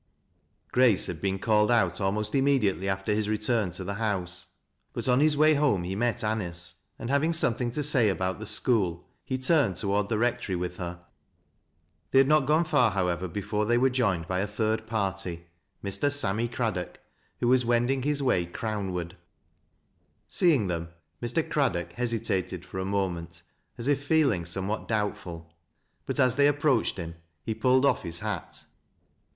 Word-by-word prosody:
Grace 125 -6 +4
had 85 -3 -5
been 95 -1 0
called 105 +1 +2
out 95 -8 +2
almost 105 +2 -1
immediately 125 - +2
after 95 +2 -1
his 105 0 -1
return 110 -1 +1
to 90 +2 -5
the 100 +2 -4
house; 95 -5 -3 0.4
but - - -5
on 125 0 +4
his 150 0 +3
way 155 +1 +5
home 140 -11 +2
he 90 +2 -3
met 120 +2 0
Anice, 90 -6 -3 0.2
and 120 - -5
having 150 +4 +2
something 120 -6 0
to 145 +5 -2
say 130 -7 +4
about 95 0 -2
the 110 - -6
school, 105 -6 +1 0.2
he 130 - -2
turned 130 - +2
toward 100 0 -1
the 110 - 0
rectory 115 -4 0
with 90 0 -4
her. 85 -1 -6 1.1
They - - +2
had 135 0 +6
not 150 -2 +3
gone 155 +3 +4
far, 145 -8 +3
however, 90 -2 -1
before 105 +3 -2
they 120 +1 +3
were 130 +2 +3
joined 100 -10 0
by 90 0 -1
a 100 - -1
third 110 +1 -1
party, 95 -6 -2 0.2
— - - -45
Mr. 120 +9 +1
Sammy 115 -5 +1
Craddock, 110 -7 -3 0.4
who 120 - 0
was 130 0 +4
wending 120 +3 +1
his 145 +1 -1
way 90 -10 +1
Crown 100 0 -4
ward. 85 0 -4 1.1
Seeing 155 - +3
them, 85 -2 -3 0.3
Mr. 120 +7 -1
Crad 140 -5 +1
dock 85 -1 -5
hesitated 95 -7 -2
for 95 - -6
a 95 - -2
moment, 90 -4 -3 0.3
as 120 - -4
if 145 -1 +1
feeling 145 - +2
somewhat 95 +5 -3
doubtful; 85 -7 -3 0.5
but - - -3
as 130 0 +3
they 140 0 +5
approached 145 -7 +1
him, 85 -2 -5 0.3
he 110 - -2
pulled 130 +4 +3
off 140 - +2
his 85 -1 -5
hat. 105 -5 -5
105 Hz, 175 wpm, -27 LUFS, 95-130 Hz, 1.1 s, had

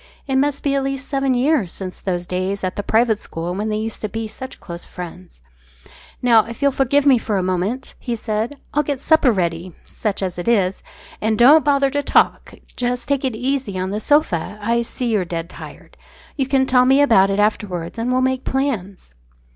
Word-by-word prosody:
It 270 -2 0
must 280 +1 0
be 280 - +1
at 275 -1 +1
least 275 0 -3
seven 275 -2 0
years 250 - +1
since 185 -2 -7
those 175 -2 -2
days 185 +2 -3
at 185 - -2
the - - -2
private 220 0 +2
school 170 +2 -5
when 210 +3 -2
they 215 - -1
used 220 +1 -4
to 215 - -3
be 225 +1 -4
such 260 +4 -9
close 170 0 -8
friends. 180 - -10 0.8
"Now, 230 -3 +6
if 230 0 -9
you'll 280 -1 +3
forgive 275 +2 +2
me 265 -4 +6
for 215 -3 -2
a 185 - 0
minute," 185 +8 -2
he 240 -2 -3
said, 225 +4 -3 0.2
"I'll 295 - +3
get 285 -2 -3
supper 315 -4 +4
ready 175 -3 -2
such 205 -3 -3
as 180 -2 -3
it 175 - -5
is. 195 -5 +2 0.4
And 220 0 +1
don't 290 +7 +7
bother 280 -2 +2
to 285 +1 0
talk. - - +1 0.2
Just 245 0 -2
take 280 -1 +1
it 260 -4 -1
easy 250 -4 -2
on 185 +1 -2
the 210 - -2
sofa. 215 - +1
I 230 +3 +1
see 235 +1 -3
you're 210 -4 +2
dead 170 -1 -5
tired. - - -12 0.4
You 270 -3 -1
can 265 -1 +2
tell 250 -1 +4
me 265 +2 +5
about 225 -9 +5
it 195 +1 0
afterwards, 205 -3 -1
and 240 +2 -1
we'll 255 0 +2
make 260 0 0
plans." 210 - -3
230 Hz, 210 wpm, -20 LUFS, 190-265 Hz, 0.8 s, don't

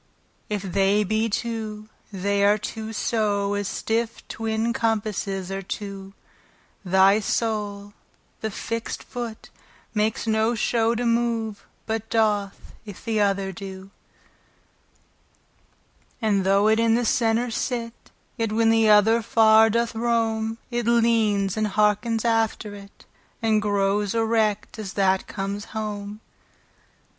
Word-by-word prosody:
If 205 -2 -2
they 195 +2 +2
be 220 +3 0
two, 215 -1 -4 0.2
they 200 +1 0
are 205 +1 +5
two 220 +1 -6
so 205 -2 0
As 205 -1 -2
stiffe 230 +2 -2
twin 225 +1 -2
compasses 205 -4 -2
are 195 0 -3
two, 195 0 -7 0.7
Thy 190 +2 +4
soule 205 -2 -2 0.5
the 220 - -3
fixt 230 +2 -4
foot, 240 -3 -7 0.4
makes 215 +1 0
no 220 +1 +1
show 230 0 +1
To 240 +1 -2
move, 230 -3 -1 0.2
but 225 0 -3
doth, 210 -3 0
if 205 -4 -11
th' 225 -2 0
other 195 -1 +1
doe. 190 +1 -9 2.3
And 205 -5 +1
though 200 +2 +4
it 220 +1 +3
in 230 0 +3
the 240 0 0
center 230 +1 +1
sit, 230 0 -2 0.4
Yet 225 -2 -1
when 225 +1 +3
the 225 -1 +4
other 215 +2 +5
far 220 0 +5
doth 235 +1 0
rome, 225 -1 0
It 240 -1 -2
leanes, 225 -4 +2
andhearkens 215 +2 +1
after 225 -2 0
it, 200 0 -13 0.3
And 220 -2 +2
growes 205 0 0
erect, 220 -2 0
as 200 -3 -6
that 190 -1 +1
comes 200 +1 -4
home. 210 0 -5
215 Hz, 125 wpm, -24 LUFS, 200-225 Hz, 2.3 s, are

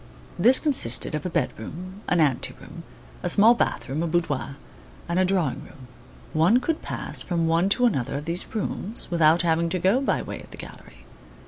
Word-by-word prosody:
This 245 +8 +5
consisted 255 - 0
of 150 +3 -3
a - - -4
bed 165 -6 0
room, 185 - -8
an 175 - +2
ante 140 -6 +1
room, - - -11 0.4
a - - -1
small 220 +4 +7
bath 235 - -1
room, 140 +4 -3
a 170 - -1
boudoir, 145 -6 -2 0.5
and 170 +1 0
a 185 - +3
drawing 180 -8 -1
room. 130 -2 -15 0.4
One 170 +10 +4
could 310 +5 -2
pass - - -3
from 170 -2 -1
one 165 +4 +2
to 245 +5 +2
another 135 - 0
of 145 - -6
these 170 +2 -3
rooms 215 -1 -2
without 165 0 +4
having 170 0 +1
to 185 - -1
go 190 +9 +2
by 275 - 0
way - - -7
of - - -15
the - - -12
gallery. - - -13
170 Hz, 200 wpm, -24 LUFS, 150-195 Hz, 0.5 s, small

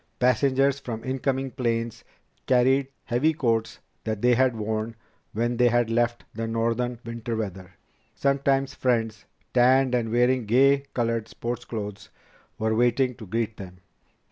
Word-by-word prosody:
Passengers 135 +2 +2
from 115 -4 -6
incoming 135 0 -1
planes 115 -1 -2 0.4
carried 130 +2 +3 0.2
heavy 140 +7 +1
coats 115 -6 0 0.3
that 110 -2 -2
they 125 0 +5
had 130 0 +3
worn 110 +1 -3 0.4
when 120 +2 -1
they 125 0 +5
had 120 -1 +2
left 120 0 +1
the 115 +1 -3
northern 115 +2 -1
winter 115 0 -4
weather. 95 -4 -5 0.4
Sometimes 140 -1 +1
friends, 115 -5 -1 0.3
tanned 130 +1 +4
and 120 -2 +1
wearing 125 0 +2
gay 140 +4 +4
colored 115 -2 0
sports 120 +1 -5
clothes, 105 -3 -6 0.5
were 110 0 0
waiting 120 +3 +2
to 110 -3 -11
greet 115 +2 -2
them. 90 -2 -9
120 Hz, 140 wpm, -25 LUFS, 115-130 Hz, 0.5 s, they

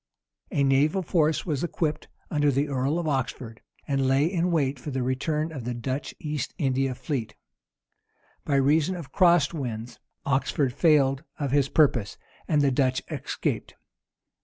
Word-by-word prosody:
A 140 - +1
naval 145 +7 +3
force 155 -2 +1
was 150 -4 -2
equipped 160 -3 -2 0.2
under 145 -1 +2
the 140 +2 +1
earl 135 +3 0
of 170 -2 -2
Oxford,[] 130 -4 -3 0.3
and 135 -2 +1
lay 135 +2 +3
in 175 0 0
wait 140 -5 0
for 150 - -6
the 130 -2 -2
return 150 +5 -1
of 140 -6 -6
the 120 +1 -3
Dutch 130 +4 -4
East 150 -2 -4
India 135 -2 0
fleet. 125 -6 -4 1.1
By 140 - 0
reason 150 +6 +3
of 160 -7 -8
cross 175 -6 +4
winds, 120 -5 -5 0.3
Oxford 135 -1 0
tailed 140 -4 +4
of 140 -3 -2
his 140 -1 +2
purpose, 130 -9 +2 0.3
and 150 -2 +3
the 140 - +3
Dutch 130 -1 +1
escaped. - - -3
140 Hz, 155 wpm, -26 LUFS, 130-155 Hz, 1.1 s, cross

